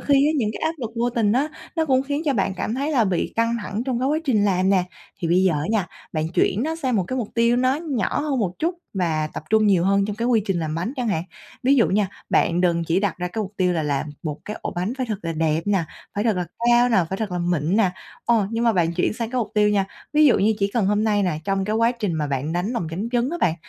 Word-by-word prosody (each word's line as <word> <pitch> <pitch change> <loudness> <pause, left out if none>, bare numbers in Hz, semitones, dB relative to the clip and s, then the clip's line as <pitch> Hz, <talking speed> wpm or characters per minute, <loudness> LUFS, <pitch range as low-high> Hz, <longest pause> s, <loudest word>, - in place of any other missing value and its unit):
khi 285 - +2
á, 305 - +2
những 225 -7 +1
cái - - -7
áp 320 - +1
lực 235 -5 -4
vô 240 +1 +1
tình 225 -4 +1
đó 270 +6 +1 0.3
nó 325 - +2
cũng 260 -2 +3
khiến 285 +2 -2
cho 290 - +2
bạn 195 -3 0
cảm 220 - -2
thấy 280 +4 -1
là 255 -7 +3
bị 185 -4 -1
căng 230 +1 +2
thẳng 210 +3 -3
trong 255 -3 -1
cái 260 - +1
quá 305 +2 +1
trình 225 -8 +2
làm 190 -1 +2
nè. 190 -2 +3 0.4
Thì 170 - -1
bây 180 +2 +4
giờ 190 -2 +3
á 150 0 -1
nha, 215 -5 +1 0.3
bạn 155 -1 -1
chuyển 205 +6 +2
nó 320 +2 -2
sang 260 -8 0
một 190 - +1
cái 260 - -2
mục 225 -4 -3
tiêu 235 +1 +3
nó 255 +1 +2
nhỏ 295 -6 -1
hơn 290 -3 -1
một 195 -6 0
chút 335 +3 0 0.2
và 160 -5 0
tập - - -7
trung 220 0 +4
nhiều 185 -4 +3
hơn 200 +1 +3
trong 205 -1 -4
cái 230 +2 -1
quy 230 -4 +3
trình 195 -3 0
làm 155 -2 -2
bánh 175 +9 -2
chẳng 250 -3 -1
hạn. 165 -6 0 0.4
Ví 270 +3 +4
dụ 235 - +4
nha, 200 0 +1 0.2
bạn 170 +1 +2
đừng 170 -2 +2
chỉ 170 +3 +1
đặt 200 -3 -1
ra 180 0 -2
cái 220 +5 -3
mục 195 -1 -7
tiêu 180 -1 +2
là 165 -2 0
làm 145 0 -1
một 155 -3 -4
cái 210 - -5
ổ - - -2
bánh 180 +6 -1
phải 255 - -1
thật 215 -4 -3
là 165 - -2
đẹp 160 0 +1
nè, 195 -4 +2 0.3
phải 205 +1 -1
thật 220 -4 +2
là 180 - -1 0.2
cao 240 +1 +5
nè, 235 - +2
phải 190 - -1
thật 220 -3 -2
là 180 - -1
mịn 175 0 0
nè. 210 -5 +3 0.3
Ờ, 230 -4 +3
nhưng 230 +1 -1
mà 230 - +4
bạn 170 -4 +1
chuyển 175 - +1
sang 225 +1 -4
cái 255 - -1
mục 235 - -2
tiêu 210 -1 +4
nha, 205 -2 +2 0.3
ví 305 0 +5
dụ 265 - +5
như 215 +3 +3
chỉ 200 -1 0
cần 225 -5 +2
hôm 210 +2 +2
nay 210 -2 +2
nè, 180 -5 0
trong 195 +1 0
cái 215 +2 -1
quá 230 +1 +3
trình 215 -7 -2
mà 155 -2 -1
bạn 140 +2 -2
đánh 180 +5 -1
lòng 230 -9 -2
trắng 195 +8 -3
trứng 245 +2 +1
á 345 - -2
bạn, 160 - +3
210 Hz, 300 wpm, -23 LUFS, 180-240 Hz, 0.4 s, cao